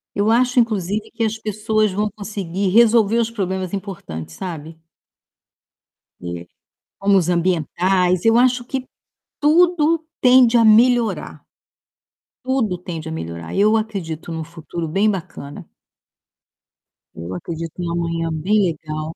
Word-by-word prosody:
Eu 205 +2 +1
acho, 245 +2 +3
inclusive, 210 -2 -1
que 230 - -3
as 220 0 -1
pessoas 215 0 0
vão 210 +2 -1
conseguir 200 -2 -3
resolver 230 +1 +4
os 230 -1 0
problemas 190 -3 -3
importantes, 80 - -6
sabe? 160 -3 -7 1.5
Eh, 85 0 -6 0.6
como 200 0 +3
os 170 - -4
ambientais. 180 +2 +1
Eu 225 - +5
acho 250 -1 -1
que 260 -1 -3 0.6
tudo 335 +1 +4 0.4
tende 250 -1 +6
a 230 - +5
melhorar. 235 +1 +3 1.1
Tudo 235 -9 0
tende 165 -3 -7
a - - -5
melhorar. 85 - -6
Eu 215 +3 +4
acredito 180 -7 -5
num 160 -1 -4
futuro 165 +1 -7
bem 195 +7 +1
bacana. 175 -7 -6 1.5
Eu 85 +3 -7
acredito 165 - -6
num 175 -1 -3
amanhã 165 -1 -2
bem 200 +7 +1
legal. 155 -1 -4
195 Hz, 125 wpm, -20 LUFS, 165-220 Hz, 1.5 s, tende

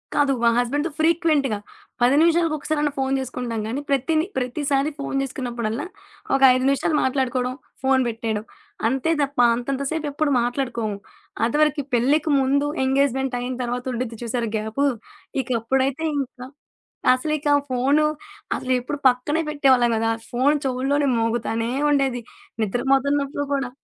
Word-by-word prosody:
కాదు, 285 -1 +3
మా 235 - +6
హస్బెండ్‌తో 285 +7 0
ఫ్రీక్వెంట్‌గా. 315 -7 +2 0.4
10 245 +3 +5
నిమిషాలకొకసారన్నా 310 -3 +1
ఫోను 270 0 0
చేసుకుంటాంగానీ, 245 -1 -3
ప్రతిని 310 +4 +1
ప్రతిసారి 275 +3 0
ఫోను 275 -1 -3
చేసుకున్నప్పుడల్లా 240 -2 -3 0.5
ఒక 270 - 0
5 255 0 0
నిమిషాలు 275 +3 +1
మాట్లాడుకోవడం, 255 -1 0 0.3
ఫోను 265 0 +3
పెట్టేయడం. 220 -2 -3 0.4
అంతే 265 +6 0
తప్ప 280 -2 -2 0.2
అంతంత 265 +3 -3
సేపు 320 -1 -2
ఎప్పుడు 290 +1 0
మాట్లాడుకోము. 235 -4 -2 0.5
అదివరకి 300 +4 +2
పెళ్ళికి 280 +7 +2
ముందు, 280 +2 +2 0.2
ఎంగేజ్మెంటయిన 265 -2 0
తర్వాత 245 +1 -3
ఉండిద్ది 235 -1 -4
చూసారు 235 -1 -2
గ్యాపు. 220 +7 -1 0.6
ఇక 255 - -12
అప్పుడైతే 265 +5 0 0.2
ఇంకా, 255 -2 -6 0.7
అసలు 280 +4 -2
ఇక 295 0 -3 0.2
ఫోను 270 +5 +2 0.5
అసలు 255 - -2
ఎప్పుడు 280 +4 -5
పక్కనే 255 +6 0
పెట్టేవాళ్ళం 260 -5 +3
గాదు. 225 0 0
ఆ - - 0 0.2
ఫోను 265 +5 +3
చోవుల్లోనే 270 +3 +1
మోగుతానే 230 0 -1 0.2
ఉండేది. 270 -4 +1 0.4
నిద్ర 215 +4 -1
పోతున్నప్పుడు 280 +1 +1
కూడా. 270 -3 -2
265 Hz, 130 wpm, -23 LUFS, 245-285 Hz, 0.7 s, మా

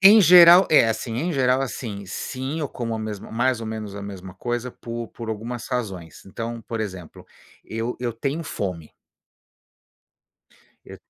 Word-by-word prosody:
Em 205 +3 +9
geral 175 0 +9
é, 135 -7 +6
assim, 115 +1 -3
em 170 +7 -1
geral, 130 -1 +2
assim, 115 -6 -5
sim, 130 - -4
como 115 -2 -3
a - - -3
mesma 110 -2 -6
mais 120 +1 +1
ou 115 - -5
menos 110 -2 -5
a 100 - -6
mesma 95 -2 -8
coisa 120 +3 -3
por 115 -1 -7
por 115 -2 -9
algumas 115 +2 -5
razões, 95 - -4
então, 115 +4 -6
por 115 +1 -5
exemplo, 95 -6 -7 0.4
eu 115 +2 -4
eu 120 -1 -2
tenho 140 +8 -3
fome. 90 - -5 1.9
Eu - - -10
115 Hz, 155 wpm, -23 LUFS, 105-130 Hz, 1.9 s, Em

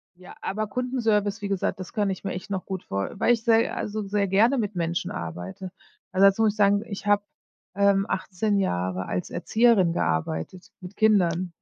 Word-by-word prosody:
Ja, 180 0 -13
aber 215 +2 -2
Kundenservice, 225 -3 0
wie 200 - -3
gesagt, 195 -1 -1
das 185 - -8
kann 205 -2 0
ich 190 - -4
mir 195 - -3
echt 195 +4 -7
noch 190 -2 -3
gut 190 -2 -5
vor 100 0 -3
weil 240 - +4
ich 230 -1 -2
se 225 0 +3
also 215 +1 -3
sehr 200 0 0
gerne 225 +8 +3
mit 210 -3 -2
Menschen 170 0 -2
arbeite. 90 - -6 0.4
Also, 190 +1 +4
dazu 195 +3 +2
muss 215 - +3
ich 215 - -17
sagen, 205 +1 +3
ich 200 -2 -7
habe, 205 0 +3 0.5
ähm, 200 0 +3
18 195 +2 -1
Jahre 90 - -1
als 90 - -3
Erzieherin 220 -7 +3
gearbeitet, 80 - -2
mit 185 +2 -10
Kindern 185 -5 +2
195 Hz, 190 wpm, -25 LUFS, 180-210 Hz, 0.5 s, weil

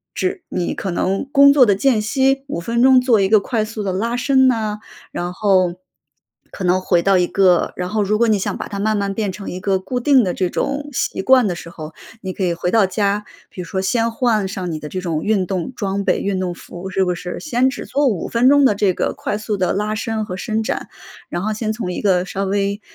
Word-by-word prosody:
只 375 0 -2
你 175 - -2
可 195 - -4
能 195 +7 -1
工 280 0 +7
作 280 -3 +6
的 200 - +4
间 230 +1 +2
隙 265 +5 +1
5 275 - -4
分 230 +7 -1
钟 260 0 +6
做 245 -5 +3
一 190 - +1
个 215 0 +6
快 220 +2 -1
速 215 0 -5
的 190 -2 -2
拉 230 +5 -1
伸 265 +1 +3
呐， 215 -4 0 0.3
然 175 0 -4
后 185 -3 +2 0.8
可 190 - -5
能 185 +1 +2
回 175 -2 +2
到 195 +1 +3
一 180 - +2
个 185 -3 +3
然 180 0 -2
后 210 +2 0
如 210 +2 +1
果 235 - +2
你 215 -2 +3
想 195 - -3
把 - - -6
它 200 - -6
慢 215 +1 +1
慢 200 -1 -1
变 205 -2 -2
成 195 +1 -8
一 180 - -5
个 195 -1 +1
固 245 +7 -4
定 270 0 +5
的 180 -3 -1
这 185 -2 -1
种 285 +1 -3
习 245 - -2
惯 255 +1 +4
的 180 - -2
时 170 - -9
候， 155 -2 -9 0.3
你 190 -2 -5
可 190 - -4
以 175 - +1
回 175 +1 -2
到 220 -3 +4
家， 200 +1 0 0.3
比 180 - -8
如 - - -7
说 190 - -3
先 230 +4 0
换 225 -4 +1
上 185 -2 -4
你 155 - -3
的 150 - -8
这 185 - -4
种 165 -4 -3
运 205 -3 +1
动 185 +3 -3
装 200 -3 -2
备、 - - +1
运 195 -2 -2
动 180 -1 -2
服， 175 +2 -9
是 190 0 +1
不 180 - -1
是， 180 +1 -6
先 260 -3 +1
只 270 - -6
做 285 0 0
5 205 -9 -1
分 240 +3 +3
钟 285 0 +5
的 210 - +3
这 200 -1 +2
个 - - -1
快 210 - -3
速 215 0 -3
的 185 -2 0
拉 210 +2 -1
伸 220 0 -3
和 180 - -6
伸 215 +4 -2
展， - - -3 0.4
然 175 - -3
后 215 +3 -1
先 215 0 -2
从 215 -5 -4
一 - - -4
个 185 -3 +2
稍 195 +1 -3
微， 200 +1 -1
200 Hz, 265 characters per minute, -19 LUFS, 185-230 Hz, 0.8 s, 工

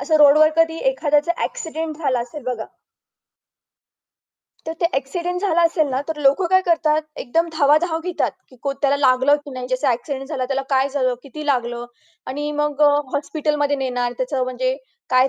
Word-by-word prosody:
असं 310 +3 +2
रोडवर 305 +1 +6
कधी 330 0 +3
एखाद्याचा 300 -6 +1
ॲक्सिडेंट 320 -8 -4
झाला 270 -6 0
असेल 245 +5 -7
बघा. 245 -3 -3 2.0
तर 320 - -2
ते 340 - +4
ॲक्सिडेंट 345 +7 -2
झाला 355 -4 +2
असेल 330 -2 +2
ना 260 0 -1
तर 320 - -2
लोकं 280 +6 +3
काय 375 0 +5
करतात? 315 -2 +2
एकदम 330 +6 0
धावाधाव 315 +2 +3
घेतात. 360 -2 -1 0.2
की 255 - -18
को 275 - -1
त्याला 275 +1 +1
लागलं 265 +1 +4
की 290 - -9
नाही. 255 -1 -6
ज्याचा 255 +2 +1
ॲक्सिडेंट 270 +3 -3
झाला 270 -5 -2
त्याला 270 +1 -1
काय 270 0 +3
झालं? 260 -3 0
किती 300 +2 -8
लागलं? 240 -3 -1 0.4
आणि 295 +2 -3
मग 295 0 -1
अ, 295 - +7 0.2
हॉस्पिटलमध्ये 290 0 0
नेणार. 245 -2 -1
त्याचं 260 0 -1
म्हणजे 255 +1 -1 0.3
काय 255 +1 +5
285 Hz, 170 wpm, -21 LUFS, 260-315 Hz, 2.0 s, अ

